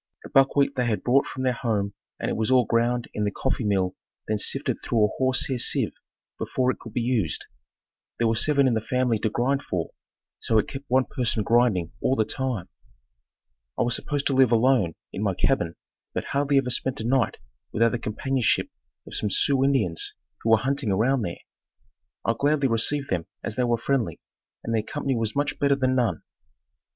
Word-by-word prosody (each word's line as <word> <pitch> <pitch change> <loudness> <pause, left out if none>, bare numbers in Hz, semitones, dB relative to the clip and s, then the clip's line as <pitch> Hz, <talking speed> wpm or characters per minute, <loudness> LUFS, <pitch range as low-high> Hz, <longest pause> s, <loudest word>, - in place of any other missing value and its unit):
The - - -10
buckwheat 140 +1 +3
they 125 -2 0
had 110 -3 -1
brought 135 +3 +3
from 130 - -5
their 130 -1 +2
home 105 -5 -1 0.3
and - - -2
it - - -1
was 110 +1 0
all 130 -2 +5
ground 120 +1 +1
in 105 - -2
the 105 - +1
coffee 130 +4 -2
mill 95 -3 +1 0.3
then 110 -1 0
sifted - - 0
through 110 -3 +3
a - - 0
horsehair 130 0 +1
sieve - - +1 0.5
before 130 0 +1
it - - -8
could 115 - -10
be 120 - 0
used. 115 - 0 0.7
There 120 - +2
were 115 - +2
seven 140 +3 +3
in 125 - +2
the 110 - 0
family 125 -1 0
to 110 - 0
grind 130 +6 0
for, 85 -9 -3 0.5
so 110 - +1
it 105 - +2
kept 135 +1 -7
one 130 +1 +3
person 115 -4 -1
grinding 115 -8 +2
all 130 - +2
the 110 - +2
time. 130 -8 -2 1.1
I - - +2
was 120 0 +1
supposed 145 -1 -3
to 140 - +2
live 130 -2 +5
alone 115 -7 +3 0.2
in 95 - -4
my 100 -3 0
cabin 85 -11 +1 0.4
but - - -1
hardly 140 0 +1
ever 130 -2 +1
spent 130 +1 -1
a - - -3
night 125 -2 +1 0.3
without 115 +1 +3
the 120 - -2
companionship 125 +2 0 0.3
of - - -11
some 105 - -1
Sioux 135 +6 +3
Indians 110 -12 +1 0.3
who 115 - -1
were 110 - +7
hunting 135 +1 -1
around 120 +7 +2
there. 85 -5 -3 0.9
I 115 - +3
gladly 145 -1 +2
received 130 +5 0
them 90 -1 -1 0.2
as 105 - -4
they 125 - +1
were 120 -1 +2
friendly, 125 0 -1 0.4
and 115 - -2
their 110 - +2
company 140 +3 -2
was 110 -2 -2
much 145 0 -1
better 140 -1 +3
than 130 -1 +1
none. 120 -10 0
120 Hz, 200 wpm, -25 LUFS, 110-135 Hz, 1.1 s, were